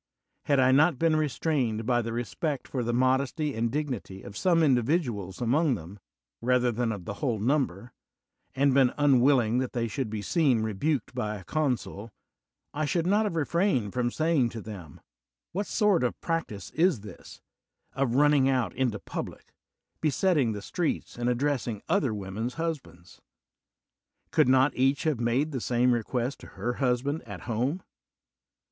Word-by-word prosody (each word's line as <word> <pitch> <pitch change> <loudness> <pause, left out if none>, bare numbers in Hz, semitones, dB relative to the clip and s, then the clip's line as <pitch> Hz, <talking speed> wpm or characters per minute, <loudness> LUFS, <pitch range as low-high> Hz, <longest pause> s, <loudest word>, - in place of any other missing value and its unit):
Had 140 -2 +3
I 130 0 +5
not 150 +2 +4
been 165 +1 +2
restrained 135 -6 0
by 120 0 +2
the 115 0 -4
respect 120 - -3
for 125 -3 -2
the 120 - -1
modesty 130 +4 +1
and 115 0 0
dignity 125 -9 -4
of 100 - -10
some 170 -3 +3
individuals 120 - 0
among 135 +4 +2
them, 95 +2 -10 0.4
rather 125 0 +2
than 115 0 -1
of 100 -5 -6
the 100 - -4
whole 120 -6 0
number, 125 -2 -1 0.6
and 140 0 +3
been 130 -2 +4
unwilling 130 -4 +4
that 130 -1 -3
they 115 -1 -1
should 115 +1 -3
be 105 -1 -4
seen 135 - +2
rebuked 110 +5 -1
by 105 0 -2
a 95 - -9
consul, 125 - -2 0.6
I 155 +1 -1
should 165 +3 0
not 205 +4 +3
have 200 - -2
re 160 -3 +1
frained 135 - 0
from 125 -1 0
saying 155 -3 +1
to 115 -1 -7
them, 95 -10 -10 0.5
''What 200 +3 -2
sort 210 - +2
of 125 - -1
practise 135 - -3
is 170 - +2
this, 105 - -12 0.5
of 130 -3 0
running 145 -1 +4
out 125 -8 0
into 125 -5 0
public, - - -7 0.5
be 155 - +2
setting 145 - +2
the 105 -1 -6
streets, 170 - -2
and 120 0 -1
addressing 125 -4 -1
other 150 - +2
women's 105 +4 -4
husbands? 155 - -6 1.1
Could - - +4
not 130 +1 +4
each 135 +2 +2
have 155 -6 0
made 125 +6 +1
the 130 -4 -3
same 125 +1 +2
request 120 +3 -2
to - - -12
her 120 +1 -2
husband 135 +4 0
at 100 -5 -8
home? 125 - -2
125 Hz, 165 wpm, -28 LUFS, 115-150 Hz, 1.1 s, I